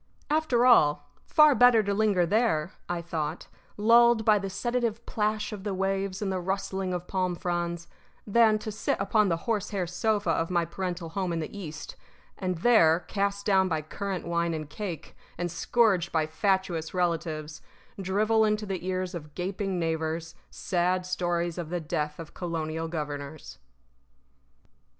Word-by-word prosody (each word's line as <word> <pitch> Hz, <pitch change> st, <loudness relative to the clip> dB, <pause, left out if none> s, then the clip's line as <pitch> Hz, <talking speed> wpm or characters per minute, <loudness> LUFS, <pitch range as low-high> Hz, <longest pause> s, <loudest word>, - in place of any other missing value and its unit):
After 300 Hz, -6 st, +2 dB
all, 145 Hz, -11 st, +4 dB, 0.2 s
far 305 Hz, -1 st, +6 dB
better 245 Hz, -3 st, +6 dB
to 200 Hz, 0 st, -1 dB
linger 200 Hz, -4 st, +2 dB
there 190 Hz, -5 st, +1 dB, 0.2 s
(I 175 Hz, -1 st, -2 dB
thought), 160 Hz, -3 st, -4 dB, 0.3 s
lulled 230 Hz, +1 st, +5 dB
by 215 Hz, -2 st, +5 dB
the 195 Hz, 0 st, -4 dB
sedative 235 Hz, +2 st, -2 dB
plash 215 Hz, 0 st, -1 dB
of 200 Hz, -2 st, -7 dB
the 205 Hz, -2 st, -2 dB
waves 195 Hz, +1 st, -1 dB
and 195 Hz, -, -1 dB
the 185 Hz, -, -1 dB
rustling 190 Hz, 0 st, -2 dB
of 180 Hz, -1 st, -3 dB
palm 185 Hz, -2 st, -1 dB
fronds, 170 Hz, -1 st, -3 dB, 0.4 s
than 220 Hz, 0 st, +4 dB
to 215 Hz, 0 st, -6 dB
sit 210 Hz, -, -1 dB
upon 210 Hz, +1 st, +2 dB
the 165 Hz, -, +1 dB
horsehair 205 Hz, -4 st, -1 dB
sofa 200 Hz, +1 st, 0 dB
of 165 Hz, 0 st, 0 dB
my 175 Hz, -2 st, +1 dB
parental 175 Hz, 0 st, -4 dB
home 185 Hz, +1 st, -2 dB
in 165 Hz, -, -1 dB
the 160 Hz, -, -6 dB
East, 160 Hz, -6 st, -7 dB, 0.4 s
and 185 Hz, -2 st, -2 dB
there, 175 Hz, -9 st, +5 dB
cast 200 Hz, +1 st, -2 dB
down 190 Hz, -2 st, +4 dB
by 160 Hz, -3 st, -1 dB
currant 190 Hz, +4 st, -4 dB
wine 170 Hz, -1 st, 0 dB
and 155 Hz, -2 st, -6 dB
cake, 175 Hz, -4 st, -6 dB, 0.2 s
and 175 Hz, -1 st, -2 dB
scourged 195 Hz, 0 st, +2 dB
by 160 Hz, -1 st, +1 dB
fatuous 175 Hz, 0 st, -1 dB
relatives, 160 Hz, -3 st, -2 dB, 0.4 s
drivel 215 Hz, +4 st, +2 dB
into 215 Hz, 0 st, +1 dB
the 190 Hz, -3 st, -4 dB
ears 185 Hz, 0 st, -2 dB
of 150 Hz, -4 st, -8 dB
gaping 190 Hz, +1 st, -2 dB
neighbors 160 Hz, -1 st, -2 dB, 0.2 s
sad 180 Hz, 0 st, 0 dB
stories 175 Hz, -1 st, -1 dB
of 165 Hz, -3 st, -5 dB
the 175 Hz, +1 st, -2 dB
death 150 Hz, -2 st, -3 dB
of 165 Hz, -2 st, -9 dB
colonial 165 Hz, -2 st, -3 dB
governors. 145 Hz, -, -6 dB
185 Hz, 160 wpm, -28 LUFS, 165-205 Hz, 0.4 s, far